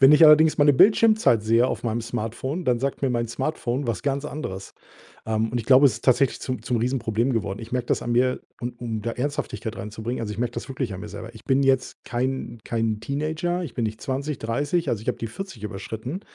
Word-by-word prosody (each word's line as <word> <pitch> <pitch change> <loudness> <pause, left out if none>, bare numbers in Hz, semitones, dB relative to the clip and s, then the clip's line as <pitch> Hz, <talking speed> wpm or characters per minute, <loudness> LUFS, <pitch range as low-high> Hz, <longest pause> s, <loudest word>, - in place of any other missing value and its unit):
wenn 135 +2 +8
ich 155 +2 +8
allerdings 155 +1 +7
meine 145 0 +6
Bildschirmzeit 215 - +5
sehe 115 +3 +4
auf - - -3
meinem 115 0 -1
Smartphone, 120 +8 -4
dann 125 -2 +2
sagt 135 +2 -2
mir 135 - +2
mein 120 -2 -1
Smartphone 130 0 -2
was 110 -7 -2
ganz 140 +1 -1
anderes. 120 -11 -6 0.5
Ähm, 110 0 0
und 120 - -1
ich 115 - -4
glaube, 135 +2 +7
es 130 - +3
ist 115 - -9
tatsächlich 130 +1 +3
zum 130 -3 -3
zum 125 +1 -1
Riesenproblem 120 0 0
geworden. 105 -4 -2
Ich 115 - -10
merke 125 -1 -1
das - - 0
an 120 - -2
mir, 125 +2 +2 0.2
und 120 0 -5
um 115 -3 -3
da 115 +1 -2
Ernsthaftigkeit 115 -5 -3
reinzubringen 110 +5 -5
also, 105 -2 -3
ich 105 - -8
merke 120 0 -1
das - - -5
wirklich 130 -5 -3
an 95 - -7
mir - - -7
selber. - - -8
Ich - - -13
bin 135 +1 +2
jetzt 135 -1 +1
kein 130 0 -2
kein 115 -2 -1
Teenager. 155 +7 -2
Ich 155 - -7
bin 120 - -1
nicht 110 0 -4
20, 140 +1 -2
30. 145 +8 -1
Also, 110 - -1
ich - - -8
habe - - 0
die 115 - -4
40 190 - -8
überschritten. 110 - -5
125 Hz, 230 wpm, -24 LUFS, 115-140 Hz, 0.5 s, wenn